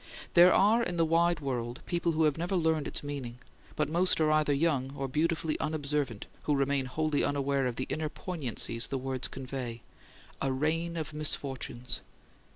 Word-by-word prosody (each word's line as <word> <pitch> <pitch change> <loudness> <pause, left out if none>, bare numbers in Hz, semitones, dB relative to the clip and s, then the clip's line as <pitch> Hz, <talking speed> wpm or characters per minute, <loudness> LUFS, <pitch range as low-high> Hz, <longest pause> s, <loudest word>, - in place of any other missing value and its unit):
There 175 +1 +8
are 215 +4 +5
in 180 -6 -1
the 165 - +4
wide 165 0 +2
world 120 -3 -3
people 170 -1 0
who 160 +1 +2
have 150 -2 +3
never 175 +4 -2
learned 160 -4 +1
its - - -2
meaning; 135 -5 -5 0.4
but 150 - +1
most 175 +4 +3
are 155 -1 +3
either 155 -1 +3
young 140 -3 +1
or 135 -1 -3
beautifully 160 +3 0
unobservant 145 -7 -2 0.2
who 150 - +2
remain 140 -1 +1
wholly 155 +2 0
unaware 140 -1 +1
of 120 - -3
the 130 - -2
inner 155 -1 -2
poignancies 125 - -1
the 135 - -2
words 130 -1 -2
convey: 130 -3 -6 0.6
"a 135 - +1
rain 165 +5 0
of 155 -1 -4
misfortunes." 135 -4 -3
150 Hz, 170 wpm, -30 LUFS, 135-160 Hz, 0.6 s, There